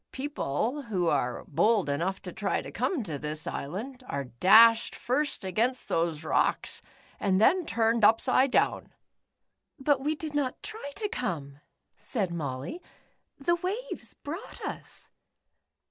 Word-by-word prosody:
* - - -57
People 265 - -2
who 195 -9 -1
are 125 -4 -1
bold 210 +5 +2
enough 170 +7 -1
to 180 - -6
tr\' 200 +1 -1
to - - -8
come 315 -11 -1
to 155 -8 -5
this 150 +1 -2
island, 235 - -5
are 140 0 -2
dashed 220 - +6
first 280 +2 -1
against 225 +7 0
those 165 -2 0
rocks, 155 - +1 0.4
and 190 -2 +2
then 345 - +4
turned 225 0 +1
upside 255 +5 +5
down." - - +1 0.8
"But 275 -1 +2
we 300 +3 0
did 310 0 -5
not 280 -3 -1
tr\ 440 - -4 0.2
to 420 0 -2
come." 145 - -4 0.3
said 195 -8 -3
Molly, 140 - -4 0.6
"the 345 +5 +1
waves 410 +8 -4
brouofht 330 +8 -7
us." - - -7
225 Hz, 140 wpm, -28 LUFS, 170-280 Hz, 0.8 s, dashed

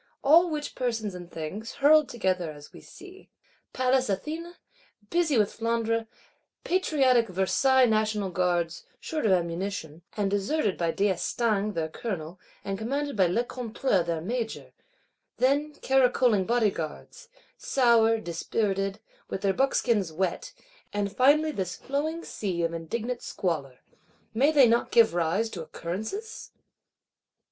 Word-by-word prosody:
All 330 +5 +6
which 300 -2 -4
persons 225 -5 -2
and 175 -1 -9
things, 180 +8 -6
hurled 300 +1 +5
together 185 -7 -1
as 145 -1 -13
we - - -12
see; 380 0 -14 0.4
Pallas 255 -1 +1
Athene, 320 - -4 0.6
busy 335 -6 +2
with 210 -2 +2
Flandre; 230 0 -1 0.6
patriotic 270 -10 +2
Versailles 255 +8 +3
National 215 -3 0
Guards, 175 -2 0 0.2
short 310 -8 -2
of - - +3
ammunition, 170 -2 -2 0.2
and 200 -2 0
deserted 205 +2 0
by 170 -1 -1
d'Estaing 205 +3 0
their 160 -1 -1
Colonel, 175 -1 -6 0.3
and 195 0 -3
commanded 280 +5 -2
by 190 -3 +4
Lecointre 235 +1 0
their 165 -1 -2
Major; 225 +4 -4 0.7
then 285 +4 +1
caracoling 250 -6 +3
Bodyguards, 220 - -2 0.3
sour, 230 -3 +3
dispirited, 195 +1 -2 0.3
with 195 - -4
their 195 -1 +2
buckskins 235 -8 +1
wet; 175 +2 -2 0.4
and 205 0 -2
finally 300 +4 +4
this 185 - -3
flowing 310 +5 -3
sea 180 -5 -3
of 165 0 -1
indignant 230 +9 -4
Squalor,—may 170 - -3
they 280 -5 +6
not 235 +1 +2
give 230 -6 +5
rise 175 +6 +1
to 175 - -6
occurrences? 220 - -6
220 Hz, 125 wpm, -27 LUFS, 185-260 Hz, 0.7 s, All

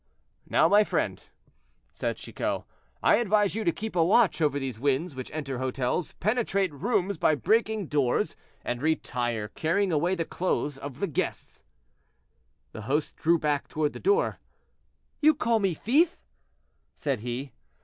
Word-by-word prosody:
"Now, - - +4
my 205 +1 +6
friend," - - -2 0.7
said - - -3
Chicot, - - -3 0.4
"I - - +5
advise 210 -3 +2
you 220 +1 -2
to 170 - +3
keep 215 +3 -6
a 170 - +4
watch 195 0 +3
over 145 -2 +2
these 130 -5 -4
winds 145 +5 0
which 130 -1 -7
enter 135 -4 -4
hotels, 130 +5 -1
penetrate 200 -4 0
rooms 190 - 0
by 155 - +4
breaking 220 +4 +1
doors, 140 -5 0 0.3
and 120 0 -2
retire, 120 -8 -1
carrying 180 - 0
away 170 +4 +1
the 165 -2 -2
clothes 150 -6 -2
of 140 +1 -8
the 200 - +1
guests." 155 - -4 1.1
The - - -8
host 150 +2 0
drew 170 +2 +3
back 150 -3 -1
toward 150 -1 -1
the - - -8
door. 405 +5 +2 0.8
"You 305 0 +6
call 230 -5 +1
me 195 -5 +1
thief!" 315 - +2 0.8
said 140 -5 -1
he. 125 +4 -5
160 Hz, 150 wpm, -27 LUFS, 135-205 Hz, 1.1 s, my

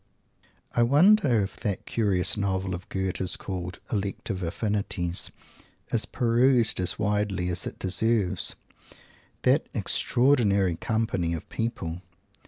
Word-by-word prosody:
I 120 - +3
wonder 145 - +5
if 95 - -6
that 105 -5 -3
curious 100 -6 +1
novel 95 -2 -1
of 90 +1 -7
Goethe's 95 -1 -1
called 90 -2 -5
the 110 - +1
"Elective 100 0 -4
Affinities" 90 -1 -1 0.6
is - - +1
perused 120 -1 +3
as 90 -1 0
widely 105 -3 0
as 90 0 -2
it - - -7
deserves? 100 0 0 0.9
That - - +3
extraordinary 105 -8 +2
company 105 -4 -1
of 80 - -7
people! 90 -7 -3
100 Hz, 115 wpm, -27 LUFS, 90-115 Hz, 0.9 s, wonder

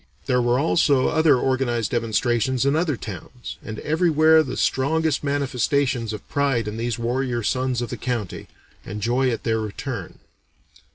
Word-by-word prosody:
There 125 -1 +2
were 120 +1 +2
also 140 -2 +3
other 160 -4 +4
organized 125 -3 0
demonstrations 120 +2 0
in 140 +1 +2
other 160 -5 0
towns, 110 +5 -8
and 110 -1 -6
everywhere 160 0 +4
the 135 -5 -4
strongest 155 +2 +1
manifestations 135 -3 0
of 105 -2 -8
pride 135 -6 0
in 105 +1 -4
these 120 +1 -2
warrior 120 0 -1
sons 125 +1 0
of 120 - -6
the - - -4
county, 120 -7 -4 0.4
and 105 +2 -6
joy 125 +5 +1
at 115 - -3
their 110 -1 0
return. 105 -2 -5
125 Hz, 155 wpm, -23 LUFS, 115-140 Hz, 0.4 s, other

